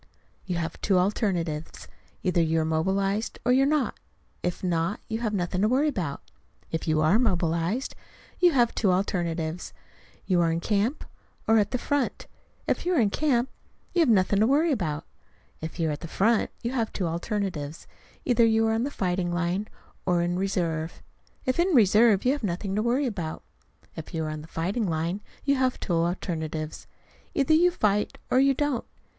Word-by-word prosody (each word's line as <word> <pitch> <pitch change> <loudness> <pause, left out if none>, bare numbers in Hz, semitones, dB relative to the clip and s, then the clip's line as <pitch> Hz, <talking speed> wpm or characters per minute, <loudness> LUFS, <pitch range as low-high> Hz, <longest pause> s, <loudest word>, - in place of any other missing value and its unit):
You 180 - -1
have 170 -1 -4
two 195 -3 +3
alternatives: 180 -5 -1 0.4
either 180 -2 +2
you 165 0 +2
are 160 - +1
mobilized 195 +6 0
or 245 - +4
you 260 +2 +5
are - - +4
not. 300 -3 0 0.4
If 180 +1 -3
not, 170 +2 0
you 220 0 -3
have 225 -3 -1
nothing 180 -2 -1
to 210 - +4
worry 270 +6 +3
about. 175 - -3 0.5
If 160 +1 -3
you 155 -1 +2
are 160 +8 +4
mobilized, 180 +1 0 0.5
you 355 -1 +6
have 240 -3 +3
two 200 -5 +2
alternatives: 175 -3 -1 0.5
you 180 -3 +2
are 165 -1 +2
in 165 - 0
camp 210 - 0 0.4
or 220 0 +5
at 205 -1 +1
the 250 - -1
front. 285 +1 -1 0.4
If - - 0
you 360 0 +1
are - - +3
in 210 -4 +3
camp, 265 -3 +1 0.4
you 355 - +1
have 320 -6 +4
nothing 200 -2 +3
to 220 - +4
worry 305 +5 +3
about. 160 - -2 0.6
If 160 +3 -6
you 165 -1 +1
are - - 0
at 145 - -4
the 170 - -7
front, 220 +6 +2
you 235 - -1
have 230 -4 -1
two 190 - -2
alternatives: 170 -3 -3 0.4
either 240 -2 +4
you 225 0 +4
are 220 - +2
on 225 +3 0
the - - -2
fighting 180 -7 -1
line 175 +4 -1 0.4
or 175 -1 +3
in 175 0 0
reserve. 175 -4 -2 0.4
If 255 +5 0
in 350 -1 +3
reserve, 215 -1 +5
you 255 - +5
have 290 - -2
nothing 195 +1 -2
to 210 - +1
worry 245 +5 +1
about. 180 -10 -4 0.5
If 160 +1 -7
you 160 - -1
are - - -3
on 155 0 -5
the 155 - -11
fighting 190 +8 -1
line, 170 +4 -1 0.2
you 280 -1 +3
have 260 -1 +1
two 180 - -2
alternatives: 165 -2 -2 0.5
either 280 +2 +3
you 345 +3 +6
fight 210 - 0
or 255 - +5
you 275 0 +4
don't. 290 -3 -1
195 Hz, 190 wpm, -26 LUFS, 170-240 Hz, 0.6 s, you